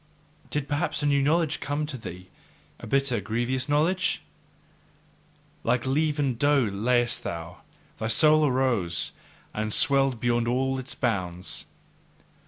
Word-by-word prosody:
Did 145 -1 -2
perhaps 145 +1 -1
a - - +1
new 140 -1 +3
knowledge 155 +2 +1
come 145 +1 -2
to 150 -2 -6
thee, 90 -6 -9 0.5
a - - -9
bitter, 135 -2 +1
grievous 120 +6 -2
knowledge? 180 +7 +1 1.4
Like 125 0 +1
leavened 145 -2 0
dough 145 -4 +3
layest 120 +3 +1
thou, 85 +1 -6 0.4
thy 110 - -2
soul 155 +6 +5
arose 120 - 0 0.4
and 110 0 -2
swelled 135 0 +4
beyond 120 0 +1
all 130 +2 0
its 130 +1 -6
bounds. 95 -7 -2
130 Hz, 125 wpm, -26 LUFS, 115-145 Hz, 1.4 s, soul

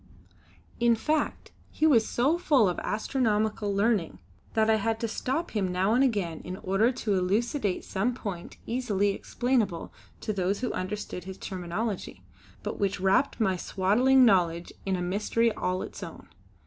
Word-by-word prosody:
In 235 0 +4
fact 300 +6 -1 0.2
he 310 - 0
was 240 -8 +5
so 285 +8 +1
full 280 - +4
of 180 - -1
astronomical 215 -2 0
learning 200 - +1 0.4
that 220 -1 +3
I 220 0 +4
had 225 +1 -1
to 230 - 0
stop 270 +9 -2
him 195 -4 -1
now 190 +4 +2
and 255 +3 +4
again 200 -11 0
in 185 +1 -7
order 195 +7 +2
to 225 -4 -2
elucidate 200 +3 0
some 230 +6 -1
point 195 -8 -6
easily 220 -5 0
explainable 220 -3 -1 0.3
to 215 - -2
those 195 +2 -1
who 250 - -1
understood 185 -2 -4
his 190 0 -7
terminology, 190 +3 -4 0.4
but - - -4
which 200 -2 0
wrapped 195 +10 +2
my 195 -4 +2
swaddling 240 +9 +3
knowledge 175 -5 +2
in 190 - +1
a 180 - -2
mystery 210 +5 +1
all 185 -2 -2
its - - -9
own. - - -9
210 Hz, 160 wpm, -28 LUFS, 190-235 Hz, 0.4 s, was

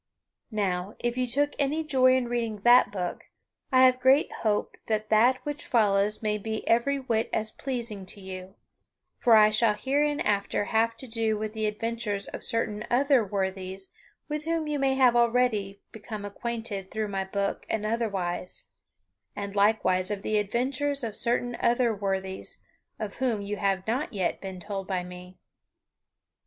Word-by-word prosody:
Now, 195 -3 -2
if 240 0 -2
you 255 0 0
took 285 +4 +1
any 295 +3 +1
joy 260 -4 +4
in 255 -2 0
reading 230 -3 -2
that 240 +3 +6
book, 180 -3 -4 0.5
I 260 0 +6
have 255 0 +4
great 260 +3 +4
hope 210 -2 -1
that 215 -1 -1
that 235 +4 +5
which 295 +2 -4
follows 210 -2 +2
may 210 0 0
be 220 +1 -4
every 240 +5 +3
whit 230 -4 -1
as 215 0 -1
pleasing 235 -7 -4
to 200 - -7
you; 190 0 -8 0.6
for 235 -2 +6
I 215 0 +7
shall 215 0 +3
hereinafter 265 -6 0
have 225 +1 +1
to 260 - -8
do 225 -2 0
with 215 0 -4
the 220 -1 -1
adventures 210 -1 -3
of - - -7
certain 215 -3 -1
other 270 0 +4
worthies 190 -1 -4 0.4
with 300 0 -4
whom 330 -1 0
you 295 -1 -1
may 270 -1 +2
have 255 -3 +5
already 235 -5 +2
become 215 -1 -7
acquainted 210 -2 -5
through 215 0 -3
my 195 -1 -1
book 200 +1 -3
and 215 -1 -1
otherwise; 195 -6 -2 0.7
and 200 0 -5
likewise 200 -3 +3
of 205 -1 -3
the 215 -1 +1
adventures 260 +6 -1
of 220 -3 -3
certain 245 +1 -1
other 240 -1 +2
worthies, 190 -2 -4 0.4
of 215 -2 -5
whom 235 -5 0
you 205 +1 -4
have 195 -2 0
not 245 +6 -2
yet 190 -4 -1
been 190 -1 -6
told 195 0 -5
by 185 -2 -1
me. 180 +1 -11
220 Hz, 165 wpm, -27 LUFS, 200-245 Hz, 0.7 s, I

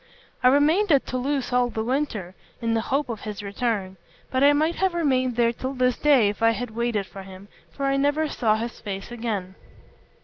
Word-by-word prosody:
I 250 - +5
remained 310 +9 +4
at 280 -3 +4
Toulouse 255 0 -2
all 245 0 +3
the 220 -2 -3
winter, 230 -8 -2 0.3
in 230 -1 -1
the 225 - +1
hope 280 +2 +1
of 230 -3 -5
his 210 -1 -6
return; 200 -2 -2 0.3
but 260 +1 +1
I 285 - +7
might 310 +3 +1
have 380 -2 +1
remained 260 -7 +1
there 235 0 +2
till 260 +3 -5
this 250 -1 +2
day 275 -8 +5
if 210 - -6
I 230 0 +4
had 225 +2 -5
waited 230 -3 -1
for 195 +1 -10
him, 190 +1 -12 0.3
for 275 - -1
I 275 0 +2
never 290 +3 +1
saw 225 -7 +1
his 230 +2 -5
face 195 +1 -6
again. 215 -6 -3
245 Hz, 205 wpm, -24 LUFS, 215-275 Hz, 0.3 s, I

